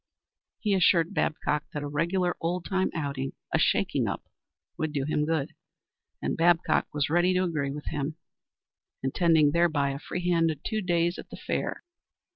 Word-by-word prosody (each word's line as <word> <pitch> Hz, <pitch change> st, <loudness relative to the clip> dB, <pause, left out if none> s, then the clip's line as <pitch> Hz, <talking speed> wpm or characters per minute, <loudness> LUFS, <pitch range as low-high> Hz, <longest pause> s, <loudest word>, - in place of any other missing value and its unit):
He 210 Hz, -3 st, +1 dB
assured 175 Hz, -2 st, +4 dB
Babcock 150 Hz, -4 st, 0 dB
that 150 Hz, -, -2 dB
a -, -, -3 dB
regular 175 Hz, +5 st, 0 dB
old 175 Hz, +1 st, -1 dB
time 190 Hz, -1 st, +1 dB
outing 140 Hz, -4 st, -3 dB, 0.2 s
a -, -, +3 dB
shaking -, -, +2 dB
up -, -, -3 dB, 0.5 s
would 155 Hz, -1 st, -2 dB
do 140 Hz, -2 st, 0 dB
him 150 Hz, 0 st, 0 dB
good, 160 Hz, -4 st, -1 dB, 0.7 s
and -, -, 0 dB
Babcock 170 Hz, 0 st, +3 dB
was 145 Hz, 0 st, -1 dB
ready 175 Hz, +2 st, +3 dB
to 185 Hz, -, +3 dB
agree 155 Hz, -6 st, -1 dB
with 145 Hz, +2 st, -6 dB
him, 150 Hz, +1 st, -3 dB, 0.9 s
intending 155 Hz, +2 st, +4 dB
thereby 155 Hz, -4 st, +2 dB
a 135 Hz, -, -5 dB
free 180 Hz, +5 st, -4 dB
handed 165 Hz, -4 st, +2 dB
two 215 Hz, -1 st, -1 dB
days 175 Hz, -2 st, +1 dB
at -, -, -10 dB
the -, -, -9 dB
fair. -, -, -3 dB
165 Hz, 165 wpm, -28 LUFS, 145-175 Hz, 0.9 s, assured